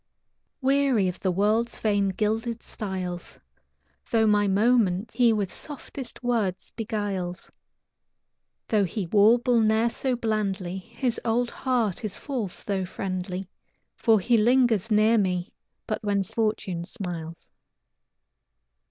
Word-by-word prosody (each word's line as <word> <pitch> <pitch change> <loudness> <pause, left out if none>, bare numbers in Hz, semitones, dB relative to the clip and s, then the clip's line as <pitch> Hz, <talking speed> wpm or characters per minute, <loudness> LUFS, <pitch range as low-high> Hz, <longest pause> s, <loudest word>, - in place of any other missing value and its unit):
Weary 270 -7 +3
of 180 - -4
the 190 - 0
world's 215 +5 +1
vain, 205 -2 +2
gilded 220 +4 -1
styles, 185 -4 -5 0.7
Though 225 -3 +3
my 205 -1 +3
moments 205 -1 +2
he 235 0 +4
with 205 -4 -1
softest 275 -3 -7
words 220 -7 -1
beguiles; 205 -5 -4 1.2
Though 210 -2 +3
he 190 +2 -3
warble 230 +6 +4
ne'er 220 +2 +3
so 260 +1 0
blandly, 200 -5 -2
His 235 +4 -3
old 240 +1 +1
heart 235 -8 -1
is 210 -3 -3
false 240 - -4
though 195 -2 -1
friendly, 185 0 -4 0.5
For 225 -2 +3
he 235 +5 +3
lingers 235 -2 +3
near 215 +1 +4
me 180 -2 -1 0.3
but 215 - -3
when 200 -1 +1
fortune 200 -4 -2
smiles. 170 -5 -6
215 Hz, 115 wpm, -26 LUFS, 190-235 Hz, 1.2 s, he